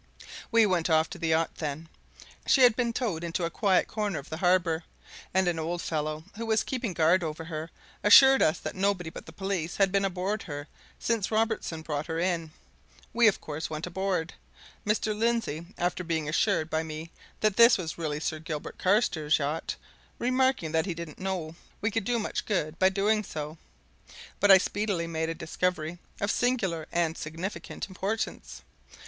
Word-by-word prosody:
We 230 -1 +6
went 180 -4 +1
off 160 0 +3
to 190 - -7
the 165 - -1
yacht 160 0 +1
then. 155 +1 -4 0.6
She 270 - +5
had 240 -3 +7
been 240 -1 0
towed 220 -9 -2
into 170 +1 -2
a 165 - -3
quiet 195 -4 +2
corner 210 -5 -2
of 140 - -8
the 160 - -3
harbour, 175 -2 +2 0.5
and 190 0 +2
an 170 -2 0
old 170 +2 -2
fellow 155 -1 -2
who 230 0 -4
was 220 0 +2
keeping 245 -7 -3
guard 170 +2 +3
over 160 0 -4
her 160 0 -5 0.3
assured 265 +6 +8
us 155 +2 +3
that - - -5
nobody 190 -3 0
but - - -10
the - - -9
police 185 -2 -3
had 195 -2 +3
been 195 0 +2
aboard 195 +2 -1
her 145 -2 -6 0.3
since 225 -4 0
Robertson 220 -7 -1
brought 150 -1 -3
her 160 -1 -3
in. 170 -2 0 0.6
We, 235 -1 +5
of 210 - +3
course, 155 +1 -5
went 155 +1 -4
aboard, 180 -2 -2 0.5
Mr. 215 0 +1
Lindsey, 225 -8 -1
after 180 +1 -1
being 160 -3 -1
assured 155 0 +1
by 160 -1 0
me 160 +1 -7 0.3
that 215 -2 +2
this 235 +2 +7 0.2
really 155 -3 -2
was 150 - -6
Sir 155 - -2
Gilbert 155 -2 -6
Carstairs' 180 -6 +2
yacht, 150 +2 -2 0.4
remarking 255 -9 +1
that 160 +3 +1
he 175 - -2
didn't 165 -2 -8
know 185 -4 -3 0.3
we 210 - 0
could 225 -2 -1
do 245 0 +1
much 215 - -3
good 165 -6 -1
by 190 - +6
doing 210 +3 +1
so. 155 -3 -6 0.8
But 205 - +3
I 195 - +11
speedily 200 -2 -1
made 160 -1 -2
a 165 - -3
discovery 170 0 -2 0.2
of 200 +1 0
singular 195 -11 0
and 170 -2 +1
significant 165 +6 -5
importance. 200 +3 -4
175 Hz, 180 wpm, -28 LUFS, 160-205 Hz, 0.8 s, I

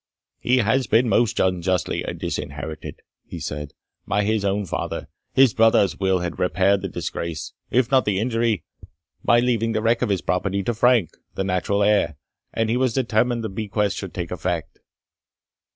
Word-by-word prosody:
"He 125 +1 +2
had 125 +1 +1
been 115 +3 +4
most 115 -1 +2
unjustly 90 -1 0 0.2
disinherited," 75 +1 -5 0.3
he 85 - -7
said, 75 -2 -5 0.3
"by 105 - +1
his 110 0 0
own 100 +1 0
father 85 - -4 0.2
his 130 -3 +5
brother's 110 -4 +4
will 95 -2 +1
had 90 -1 -4
repaired 95 +3 +2
the 95 - -3
disgrace, 85 -2 -5 0.2
if 125 0 +2
not 130 -1 +4
the 105 -2 +1
injury, 115 -3 0 0.6
by 120 0 +4
leaving 115 -2 +1
the 110 - 0
wreck 115 +1 +2
of 125 - +1
his 100 -3 0
property 100 +1 -1
to 120 - -1
Frank, 115 -4 +3 0.2
the 95 - -1
natural 95 +2 0
heir, 100 -7 +2 0.4
and 115 0 0
he 120 - +2
was 130 -2 +1
determined 120 -1 +1
the 110 - -3
bequest 105 0 -1
should 95 -3 -6
take 85 -2 -4
effect." 90 -3 -3
105 Hz, 170 wpm, -23 LUFS, 90-115 Hz, 0.6 s, his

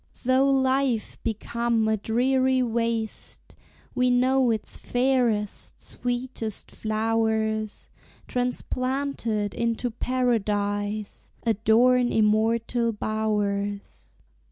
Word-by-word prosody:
Though 260 +2 +3
life 265 -3 +1
become 230 +1 -1
a 220 - +2
dreary 255 +4 +2
waste, 230 -2 -3 0.4
We 250 0 +2
know 255 +1 +3
its 220 -2 -2
fairest, 245 -5 0
sweetest 245 -3 -4
flowers, 220 -1 -1 0.4
Transplanted 250 -3 -2
into 235 +1 -1
paradise, 210 -4 -1 0.2
Adorn 235 +3 +3
immortal 225 +2 +2
bowers. 205 -2 -2
230 Hz, 75 wpm, -25 LUFS, 215-250 Hz, 0.4 s, Though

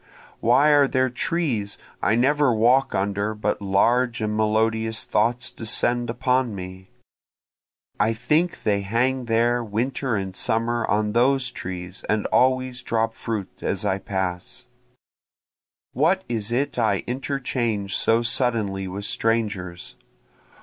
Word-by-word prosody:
Why 135 +6 +4
are 145 -1 +5
there 130 -1 +1
trees 125 -7 -2 0.2
I 105 - +2
never 140 +3 +3
walk 120 +4 +3
under 100 +2 -1
but 105 -1 -2
large 120 +5 +2
and 105 -1 -2
melodious 110 +1 +1
thoughts 120 +4 0
descend 120 +2 0
upon 125 -1 0
me? 95 0 -9 1.1
(I 110 +2 +2
think 150 +10 0
they 100 -2 +1
hang 125 +5 0
there 120 +1 +1
winter 120 +3 -2
and 95 -2 -4
summer 115 +2 -1
on 105 0 +1
those 130 +2 +2
trees 90 -2 -7
and 105 -1 +1
always 130 -1 +2
drop 115 -1 -1
fruit 110 -4 -5
as 100 +1 -1
I 100 -1 0
pass;) 95 -2 -4 1.3
What 170 +8 +2
is 115 -2 -3
it 135 +4 -1
I 100 - +1
interchange 125 -6 -2
so 115 +1 +3
suddenly 110 -6 0
with 100 +2 -5
strangers? 100 -6 -2
115 Hz, 125 wpm, -23 LUFS, 100-125 Hz, 1.3 s, are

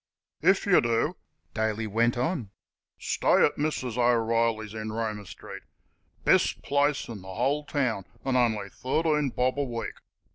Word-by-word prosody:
"If 190 +5 +4
yer 200 -3 +5
do" 115 +7 +1 0.4
Daly 110 0 -1
went 115 +3 +1
on 125 - -1 0.5
"stay - - +3
at - - -1
Mrs. 130 -5 -2
O'Reilly's, 115 -2 +2
in 110 0 -4
Roma 110 -3 -3
street. - - -9 0.6
Best - - +3
place 145 0 +1
in 115 -3 -7
th' - - -14
whole 135 +10 -1
town, 125 -9 -1 0.2
an' 135 -1 +1
on'y 110 -5 +2
thirteen 150 +3 0
bob 130 +3 0
a - - +2
week. 120 -4 -4
120 Hz, 145 wpm, -27 LUFS, 110-140 Hz, 0.6 s, yer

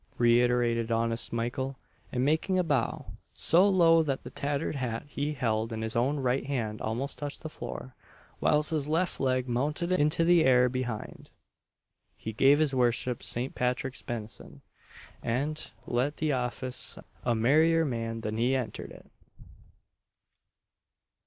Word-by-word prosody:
reiterated 120 -1 +3
honest 115 0 +1
Mykle, 120 +3 -2 0.4
and 125 0 0
making 160 +6 +1
a 180 - +3
bow 140 -8 -1 0.3
so 185 +5 +5
low 165 -4 +5
that 140 -4 -2
the - - -9
tattered 145 +2 -2
hat 115 -3 -3
he 145 +1 -3
held 115 -4 -1
in 110 0 -4
his 110 0 -3
own 130 +5 +1
right 130 0 0
hand 115 -6 -2
almost 120 +6 -3
touched 145 -1 -5
the 155 - -4
floor, 125 -1 -7 0.5
whilst 150 +1 +2
his 150 -3 0
left 170 +4 0
leg 130 -1 +1
mounted 150 +8 -1
into 155 -2 +3
the 170 -1 +5
air 125 -1 +5
behind 120 -4 -5 0.9
he 110 - -6
gave 135 +6 +5
his 155 -3 +1
worship 125 -1 +1
St. 125 +3 -3
Patrick's 125 +1 -2
benison, 105 - -7 0.6
and 145 +6 -2
let 130 +5 -1
the 155 -1 0
office 125 0 -2 0.3
a 120 -1 +1
merrier 160 +8 +4
man 115 -4 -3
than 110 0 -3
he 125 +3 +2
entered 120 -5 -4
it. - - -13
130 Hz, 145 wpm, -29 LUFS, 120-150 Hz, 0.9 s, so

